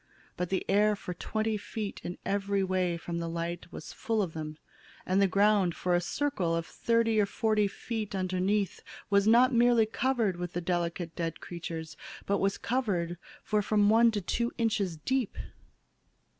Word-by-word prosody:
But 180 -1 -2
the 190 - -1
air 210 +1 +4
for 180 -2 -6
twenty 220 +4 -2
feet 210 0 -5 0.2
every 200 0 0
way 185 -2 0
from 170 0 -4
the 170 0 -3
light 170 +1 -4
was 155 - -8
full 225 -4 0
of 170 -4 -5
them, 155 -1 -6 0.5
and 190 +2 +2
the 195 - +5
ground 200 -2 +3
for 180 - 0
a 175 - +3
circle 180 - -1
of 165 0 -2
thirty 230 +1 +2
or 200 - +1
forty 215 0 +1
feet 215 0 -4
underneath 190 +1 0 0.3
was 200 +1 +4
not 245 +3 +6
merely 240 -1 +5
covered 225 -4 0
with 175 0 -5
the 175 - -1
delicate 170 -1 -2
dead 165 -2 -3
creatures, 165 -2 -6 0.3
but 200 0 +1
was 195 0 +1
covered 180 -9 -1 0.2
for 210 -1 +1
from 205 0 +3
one 230 +1 +6
to 215 -2 -2
two 235 +6 -1
inches 205 -7 0
deep! 260 - -1
200 Hz, 170 wpm, -30 LUFS, 175-220 Hz, 0.5 s, not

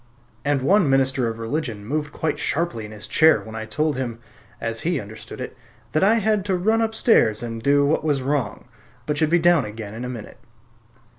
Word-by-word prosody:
And 140 -2 +1
one 185 0 +4
minister 135 -2 +2
of 115 0 -4
religion 115 -3 -3
moved 150 +4 -2
quite 155 0 -2
sharply 145 -9 -1
in 105 - -10
his 105 -1 -5
chair 160 0 +5
when 110 - -10
I 110 0 -4
told 150 +7 0
him 120 -3 -3 0.4
(as 115 0 -3
he 170 -3 0
understood 110 0 -9
it) - - -6 0.4
that 155 - +1
I 210 +4 +5
had 215 -2 +1
to 195 -2 +1
run 220 +5 +2
upstairs 220 - +3
and 115 -1 -5
do 140 +3 +3
what 150 +2 +1
was 145 -4 0
wrong, 140 -1 -2 0.4
but 150 +1 -1
should 155 - +2
be 175 - +4
down 175 0 +4
again 105 -1 -7
in 115 +2 -6
a 125 - -4
minute. 115 -4 -8
140 Hz, 205 wpm, -23 LUFS, 115-160 Hz, 0.4 s, chair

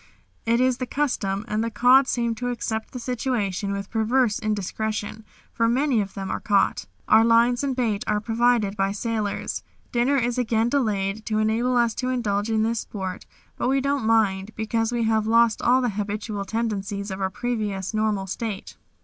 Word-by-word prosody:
It 230 +1 +3
is 255 -1 +2
the 255 - -4
custom, 220 -8 -1
and 215 0 -1
the 230 - -1
cod 255 +4 +5
seem 235 -2 0
to 245 +2 -3
accept 220 -2 -3
the - - -6
situation 230 -6 -2
with 200 0 -4
perverse 225 0 +2
indiscretion, 215 +1 -3 0.3
for 230 0 +1
many 255 -1 +2
of 200 -1 -6
them 195 -1 -4
are - - -2
caught. 205 -2 +1 0.2
Our 220 +1 +6
lines 235 +2 +4
and 270 -2 -1
bait 225 -5 0
are 210 0 +1
provided 225 -2 +1
by 195 0 0
sailors. 215 -1 -2 0.3
Dinner 250 +4 +2
is 245 -1 0
again 225 -1 +1
delayed 215 -6 0
to 215 - 0
enable 225 +4 +1
us 235 -2 +3
to 255 - -1
indulge 210 -4 -1
in 220 -1 +2
this 230 +1 0
sport, 190 -3 -6 0.3
but - - 0
we 270 +1 +3
don't 275 0 0
mind 215 -2 +1
because 225 +1 -1
we 240 -1 0
have 220 -1 +1
lost 230 0 +4
all 255 +2 +4
the 245 - +1
habitual 205 0 -3
tendencies 200 -2 -3
of 190 +1 -5
our 190 - +1
previous 210 -3 -3
normal 215 -2 0
state. 200 +1 -5
220 Hz, 185 wpm, -24 LUFS, 205-240 Hz, 0.3 s, Our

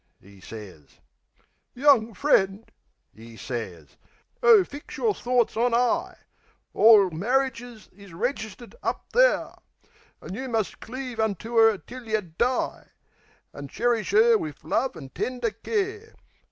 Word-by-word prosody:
'e 100 +1 -18
sez. 95 -11 -12 0.8
"Young 245 -5 +3
friend," 205 -7 +1 0.4
'e 115 +1 -13
sez. 95 - -7 0.4
"Oh 460 -5 +7
fix 285 -3 -10
yer 445 -3 +1
thorts 245 - 0
on 235 +1 +1
'igh! 245 0 0 0.6
Orl 210 -4 +6
marridges 240 +4 -2
is 200 0 -15
registered 220 +3 -5
up - - -3
there! - - +3 0.7
An' - - -9
you 260 +5 -5
must 225 -4 -2
cleave 255 -1 -7
unto 220 +2 -2
'er 225 -2 +5
till 245 +3 -12
yeh 215 -1 0 0.2
die, 250 +2 -1 0.7
An' 140 0 -8
cherish 235 - -1
'er 450 +1 +5
wiv 320 -4 -7
love 260 +3 -1
an' 135 -4 -10
tender 245 - -3
care. 420 - -4
230 Hz, 125 wpm, -25 LUFS, 195-265 Hz, 0.8 s, Oh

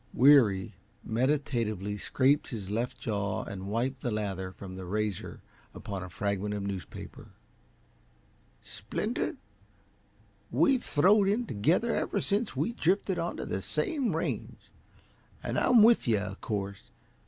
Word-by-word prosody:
Weary 120 -9 +5 0.3
meditatively 115 -6 0
scraped 140 +6 +2
his 100 -5 -6
left 115 +4 -2
jaw 100 -3 -2
and 95 -1 -7
wiped 125 +5 -1
the 125 - -1
lather 100 -4 -3
from 95 0 -9
the 95 - -7
razor 105 +1 -3 0.3
upon 100 -2 -5
a 95 - -7
fragment 100 +2 -2
of 100 - -3
newspaper. 95 -7 -7 1.4
"Splinter, - - -3 1.1
we've 170 - +3
throwed 195 +7 +4
in 220 +5 +1
together 170 - +1
ever - - 0
since 210 +3 -1
we 235 - 0
drifted 190 -2 +1
onto 170 - -3
the - - -3
same 275 - -1
range, 165 - -4 0.7
and - - -1
I'm 240 -4 +6
with 230 - +5
you, 110 -2 +4
uh 100 -1 -3
course. 100 -1 -5
115 Hz, 130 wpm, -29 LUFS, 100-165 Hz, 1.4 s, I'm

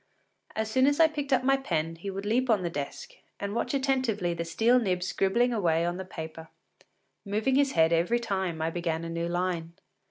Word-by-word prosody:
As 220 0 -2
soon 260 +3 +4
as 285 +1 +2
I 325 - +8
picked 290 -2 -5
up 260 - +3
my 270 +1 +4
pen, 165 -10 -2
he 175 +4 -6
would 195 +1 -5
leap 245 +4 +1
upon 210 -5 +3
the 170 - -2
desk, 145 -3 -5 0.3
and 200 0 -3
watch 235 +4 -1
attentively 260 -10 0
the 170 0 -3
steel 225 +9 +3
nib 185 -6 0
scribbling 235 +7 +1
away 170 -6 +1
on 175 +1 -2
the 190 - -5
paper, 160 -2 -8 0.8
moving 215 +5 0
his 280 0 +3
head 165 0 +4
every 175 +9 +2
time 190 -8 -2
I 165 - 0
began 165 -1 -2
a - - -5
new 170 0 -2
line. 175 -1 -2
190 Hz, 210 wpm, -28 LUFS, 170-245 Hz, 0.8 s, I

